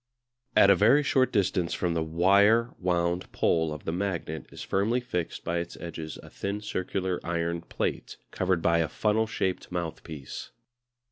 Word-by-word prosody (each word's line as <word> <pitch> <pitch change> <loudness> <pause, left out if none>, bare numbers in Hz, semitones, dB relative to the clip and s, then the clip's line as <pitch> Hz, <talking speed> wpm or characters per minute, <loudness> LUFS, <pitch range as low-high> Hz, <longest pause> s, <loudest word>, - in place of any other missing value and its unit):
At 100 - +7
a - - +7
very 115 +10 +5
short 130 -2 +2
distance 95 -4 +1
from 90 -2 0
the 85 - 0
wire 100 +8 +4
wound 90 0 0
pole 80 -2 +1
of 75 -1 -7
the - - -1
magnet 85 -4 -3
is - - -8
firmly 110 +6 +1
fixed 90 -9 -4
by 85 +1 -1
its 85 0 -6
edges 80 -2 -6
a - - -12
thin 100 +1 -3
circular 95 -2 -2
iron 85 0 -1
plate, - - -3
covered 90 -2 0
by 85 0 +3
a 80 -2 +1
funnel 110 +5 +1
shaped 95 -5 -2
mouthpiece. 80 -4 -5
90 Hz, 160 wpm, -28 LUFS, 85-100 Hz, -, At